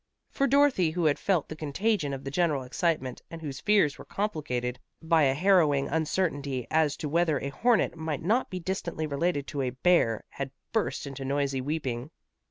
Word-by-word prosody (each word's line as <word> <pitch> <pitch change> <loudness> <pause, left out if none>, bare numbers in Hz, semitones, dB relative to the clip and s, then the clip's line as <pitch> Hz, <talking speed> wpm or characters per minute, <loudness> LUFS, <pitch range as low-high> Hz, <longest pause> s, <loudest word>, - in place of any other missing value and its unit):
For 275 - +1
Dorothy 275 - +4
who 170 +1 -1
had 150 -2 +3
felt 185 -7 +1
the 155 - -7
contagion 155 +2 0
of 135 0 -5
the 135 - -5
general 150 -4 +1
excitement, 130 -1 -1
and 165 - -8
whose 140 -4 -6
fears 195 -8 +3
were - - -8
complicated 135 -11 -2 0.2
by 160 -2 +3
a 135 0 +2
harrowing 155 -5 +3
uncertainty 145 -5 -1
as 155 -2 +2
to 150 - -4
whether 160 0 +2
a 140 - -3
hornet 225 - +2
might 160 -3 -4
not 225 +9 +1
be 185 - -4
distantly 170 -3 -3
related 145 0 -1
to 145 -2 -2
a 130 - 0
bear, 125 -4 +2
had 140 -1 -4 0.2
burst 220 -8 -1
into 135 -1 -6
noisy 135 -1 0
weeping. 135 -3 -3
155 Hz, 180 wpm, -28 LUFS, 140-175 Hz, 0.2 s, Dorothy